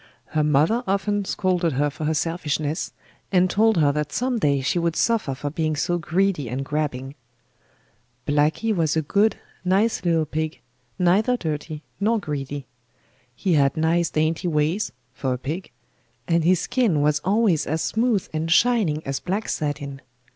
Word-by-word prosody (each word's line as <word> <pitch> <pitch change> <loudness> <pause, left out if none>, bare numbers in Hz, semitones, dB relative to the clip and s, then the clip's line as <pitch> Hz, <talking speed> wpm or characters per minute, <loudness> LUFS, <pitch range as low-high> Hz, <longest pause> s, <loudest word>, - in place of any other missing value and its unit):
Her 155 -1 +1
mother 150 - +3
often 200 +1 0
scolded 180 -4 0
her 145 +3 +1
for 155 - -5
her 155 +1 +1
selfishness, 155 -2 -2 0.4
and 185 -1 +3
told 220 0 +3
her 145 -3 +4
that 150 0 -2
some 250 -1 0
day 140 -6 +2
she 135 +6 0
would 170 -1 0
suffer 225 - +1
for 145 +2 -4
being 155 0 -1
so 175 +4 0
greedy 170 - 0
and 130 +3 -3
grabbing. 135 -3 -2 1.1
Blacky 150 +10 +2
was 160 -3 +1
a 160 - +1
good, 205 +7 +2 0.3
nice 195 +3 +2
little 165 -3 +2
pig, 155 +1 -3 0.4
neither 200 +8 +3
dirty 155 -3 -4 0.2
nor 220 +3 +2
greedy. 145 -6 -4 0.7
He 185 +7 0
had 140 -2 +3
nice 165 +1 +2
dainty 155 +3 0
ways 160 +5 0 0.2
(for 130 -1 -2
a - - -5
pig), 155 +9 -5 0.6
and 170 -1 +2
his 180 +1 +3
skin 230 - +1
was 150 0 +2
always 190 -3 +2
as 160 +2 -1
smooth 225 -3 +1
and 160 +1 -2
shining 190 -8 +3
as 135 0 -2
black 195 +4 -2
satin. 140 -2 -3
160 Hz, 160 wpm, -23 LUFS, 150-195 Hz, 1.1 s, her